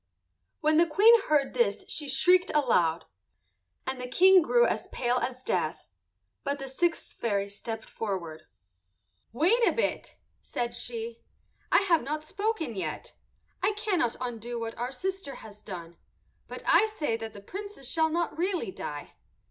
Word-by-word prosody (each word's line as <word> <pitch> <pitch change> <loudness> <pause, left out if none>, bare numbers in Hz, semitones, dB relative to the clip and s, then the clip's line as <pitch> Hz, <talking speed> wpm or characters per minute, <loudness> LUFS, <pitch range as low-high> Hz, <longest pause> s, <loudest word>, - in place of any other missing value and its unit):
When 310 0 +3
the 340 +1 +5
Queen 410 +9 +7
heard 295 -3 +2
this 475 - +1
she 295 -2 -3
shrieked 360 +7 +4
aloud, 175 - +2 0.8
and 260 -1 -3
the 250 - -3
King 375 +7 +6
grew 480 +9 +4
as - - -1
pale 245 0 0
as 255 +1 -4
death. 170 -6 -1 0.6
But 280 0 -1
the 270 -1 -6
sixth 330 +6 -1
fairy 200 -3 -1
stepped 220 +2 -6
forward. 170 -7 -5 0.8
"Wait 335 - +3
a - - +5
bit," 465 - -2 0.3
said 240 0 -3
she. 230 -1 -5 0.5
"I - - +6
have 340 -5 +3
not 305 +4 -4
spoken 400 - -2
yet. 190 - -5 0.5
I 430 - +2
cannot 390 - 0
undo 240 -1 -4
what 230 0 -4
our 245 +2 -3
sister 370 +1 -4
has 210 -1 -12
done, 170 -5 -8 0.5
but - - -8
I 440 - +5
say 295 -7 0
that 225 -1 -7
the 205 - -10
Princess 400 - -8
shall 320 +3 +2
not 340 +1 -1
really 345 - -1
die. 145 -4 -7
265 Hz, 155 wpm, -28 LUFS, 225-345 Hz, 0.8 s, Queen